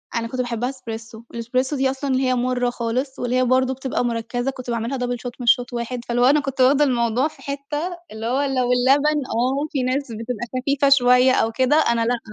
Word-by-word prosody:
أنا 230 0 -1
كنت 255 +2 -3
باحبها 245 0 -2
إسبريسو، 225 -3 -8
الإسبريسو 255 +4 -1
دي 265 -1 +1
أصلًا 270 0 -2
هي 260 -1 +1
مُرة 245 0 0
خالص، 245 +3 -3
واللي 245 0 -1
هي 255 - +3
برضو 260 +1 +2
بتبقى 260 -1 -2
مركزة، 240 +2 -2
كنت 255 -2 -9
باعملها 235 +3 -2
double 245 -1 -2
shot 245 0 -6
مش 240 +1 +5
shot 245 +1 -11
واحد 240 +1 -4
فاللي 240 0 -1
هو - - +5
أنا 285 +4 +5
كنت 275 -2 -3
واخدة 275 +3 +5
الموضوع 245 0 +1
في - - -15
حتّة 295 +5 -4
اللي 220 +1 -6
هو 255 +4 +1
لو 260 -3 0
اللبن 280 +4 +3
آه، 260 +6 -1
في 270 -3 -1
ناس 260 +1 -1
بتبقى 230 +1 -4
خفيفة 280 +2 +1
شويّة 250 -1 +5
أو 225 - +1
كده، 260 +5 +2
أنا 235 -7 +2
لأ، 240 0 0
255 Hz, 215 wpm, -22 LUFS, 240-270 Hz, -, مش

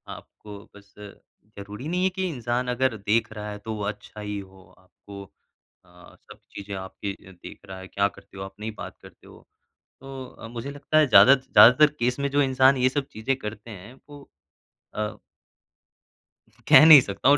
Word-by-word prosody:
आपको 105 -1 -14 0.2
बस 100 0 -19
ज़रूरी 105 +3 -12
नहीं 180 +2 -2
है 190 - +2
कि 190 0 -4
इंसान 125 -3 -3
अगर 125 -1 -1
देख 110 +3 -1
रहा 105 0 -7
है 105 - -8
तो 110 - -4
वो 105 - -6
अच्छा 105 +1 -7
ही 105 -1 -5
हो, 95 -1 -14
आपको 100 +2 -14 0.6
अ, 90 0 -19
सब - - -18
चीज़ें 100 0 -8
आपकी 95 +1 -7 0.2
देख 90 - -13
रहा 95 -1 -10
है, 95 - -11
क्या 100 +1 0
करते 95 - -16
हो, 95 - -6
आप 95 - -10
नहीं 110 +1 -5
बात - - -10
करते - - -18
हो, - - -16 0.6
तो 135 -4 -10
मुझे 120 +4 -7
लगता 145 +2 -2
है 155 -2 +4
ज़्यादा 110 +4 +7
ज़्यादातर 130 +2 +5
केस 125 +3 -1
में 140 - -1
जो 145 - +4
इंसान 130 0 +3
ये 130 0 +2
सब 140 +1 -4
चीज़ें 115 +5 -3
करते 110 -1 -9
हैं 105 +5 -12 0.2
वो 145 -1 -12 0.7
अ 105 0 -4 1.5
कह 155 - +8
नहीं 155 -4 +10
सकता 100 +4 -1
हूँ, 145 - +5
110 Hz, 185 wpm, -24 LUFS, 100-135 Hz, 1.5 s, नहीं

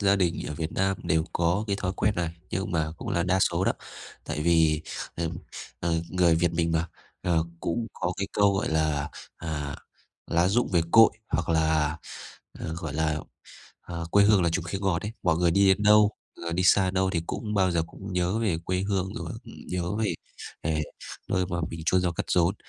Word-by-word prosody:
gia 100 -1 +4
đình 85 -3 0
ở 75 - -4
Việt 80 +1 -4
Nam 95 0 +1
đều 80 0 +1
có 85 +5 +1
cái 100 -2 0
thói 95 -2 -2
quen 105 +1 +2
này, 85 -2 0 0.2
nhưng 95 +2 -2
mà 80 -2 0
cũng - - -6
là 85 - +1
đa 95 +2 +2
số - - +2
đó, - - +3 0.5
tại - - -3
vì 80 -2 +3 0.3
ờm, 85 -1 -2 0.4
ờ, 85 -1 0
người 90 -2 +4
Việt 85 +1 +2
mình 85 -1 +1
mà, 80 +1 0 0.3
ờ, 85 -3 +2 0.2
cũng 115 +7 -1
có 90 - -2
cái 100 0 -2
câu, 100 -1 +4
gọi 95 - 0
là, 80 -2 0 0.3
à, 75 -3 -4 0.5
"Lá 85 +2 +2
rụng 120 +5 +2
về 85 -2 +4
cội", 115 -1 +8 0.2
hoặc 80 +1 -1
là, 80 -1 +2 0.6
ờ, 80 - -4
gọi 85 -4 -5
là, 80 0 +1 0.6
ờ, 85 -1 -6
"Quê 100 +2 +6
hương 105 -2 +5
là 85 - +3
chùm 85 +1 -1
khế 90 +3 -3
ngọt" 95 -4 0
ấy, 105 - -4
mọi 85 -4 +3
người 85 0 +3
đi 100 +3 +4
đến 95 +2 +3
đâu, 105 0 +6 0.3
người 85 0 -4
đi 90 - +1
xa 95 +1 +6
đến 95 - -1
đâu 95 0 +2
thì 85 -3 -1
cũng 105 -2 -3
bao 95 -2 +3
giờ 85 -1 +1
cũng 95 +4 -9
nhớ 90 +4 +1
về 100 -8 +1
quê 90 +1 0
hương, 95 -1 -1
rồi - - -5
nhớ 90 -1 -4
về 110 -2 0 0.5
về 80 -1 +1 0.5
nơi 90 0 +1
mà 85 0 -3
mình 80 - -6
chôn 95 - +4
nhau 90 - +1
cắt - - -3
rốn. 90 +2 +3
85 Hz, 215 wpm, -27 LUFS, 80-95 Hz, 0.6 s, cội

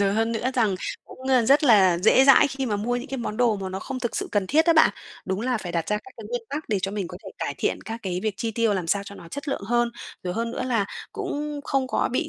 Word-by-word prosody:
rồi 195 -1 +3
hơn 225 +1 +1
nữa 235 +3 -1
rằng 220 -6 +2 0.3
cũng, - - -14
ờ, 255 -2 +5
rất 280 +6 +5
là 190 -9 +6
dễ 220 +7 +5
dãi 275 - +7
khi 270 -1 -3
mà 210 -3 0
mua 235 +4 -1
những 245 +4 -6
cái 270 - -4
món 215 -3 -4
đồ 240 -3 +3
mà 195 -1 -4
nó 190 +1 -4
không 265 -2 -5
thực 240 -3 -2
sự - - -2
cần 205 -2 +1
thiết 315 +9 +3
á 335 - +6
bạn. 315 - +6 0.3
Đúng 190 +1 -2
là 245 0 0
phải 175 -4 -6
đặt 165 -1 -1
ra 210 - +2
các 390 - -10
cái - - -9
nguyên 485 -1 -3
tắc 300 +2 -4
để 210 - +1
cho 195 - -1
mình 200 -3 -3
có 180 - -8
thể - - -7
cải - - -3
thiện - - 0
các 225 +1 -6
cái 180 -2 -2
việc 215 -3 -1
chi 230 - -2
tiêu 225 -2 +1
làm 180 -3 -2
sao 200 +4 +1
cho 200 - -9
nó 170 -4 -12
chất 285 - -6
lượng 275 - -2
hơn. 240 +1 +2 0.3
Rồi 180 -1 -3
hơn 230 +1 -1
nữa 245 - -3
là 235 -5 +1 0.3
cũng 300 -8 -4
không 270 -2 0
có - - 0
bị 315 +4 0
230 Hz, 305 wpm, -25 LUFS, 200-265 Hz, 0.3 s, dãi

